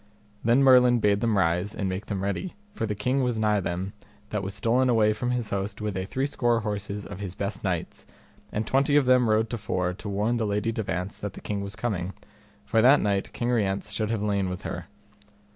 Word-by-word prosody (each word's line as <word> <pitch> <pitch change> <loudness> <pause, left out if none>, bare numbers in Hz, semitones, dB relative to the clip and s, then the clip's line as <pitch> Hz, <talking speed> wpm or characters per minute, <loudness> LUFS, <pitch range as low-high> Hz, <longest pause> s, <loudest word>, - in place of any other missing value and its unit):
Then 120 +4 +4
Merlin 125 -2 +7
bade 105 -3 +2
them 115 -3 +2
rise, 90 +3 +1
and 100 - -2
make 95 +3 -4
them 100 -3 -3
ready, 100 - -3 0.2
for 115 - -2
the 105 - -2
king 125 +7 0
was 125 -3 0
nigh 105 -1 +2
them, 95 +1 -3 0.4
that 105 - -1
was 95 +1 -5
stolen 120 +5 +2
away 110 -3 +4
from 120 +3 -2
his 125 -3 -1
host 100 +1 -2
with 105 -2 -3
a 95 0 -2
three 135 +6 -1
score 120 -5 +1
horses 105 -1 -4
of - - -8
his 95 -3 -5
best 100 +1 -4
knights, 90 -4 -3 0.4
and 110 +1 -2
twenty 140 +2 +2
of 145 -2 +5
them 125 -2 +4
rode 110 +1 +3
to 120 - -3
fore 90 -2 -1
to 105 +3 -7
warn 105 +4 0
the 110 -2 0
Lady 105 +2 0
de 115 0 -2
Vance 90 -1 -3
that 105 - -5
the - - -9
king 100 -1 -3
was 100 -1 -5
coming; 95 -6 -2 0.5
for 110 - +3
that 130 +5 +7
night 100 -2 0
King 120 - -2
Rience 100 -3 0
should 110 +1 -1
have 110 -2 -1
lain 100 -3 0
with 90 - -5
her. - - -5
105 Hz, 230 wpm, -26 LUFS, 100-120 Hz, 0.5 s, Merlin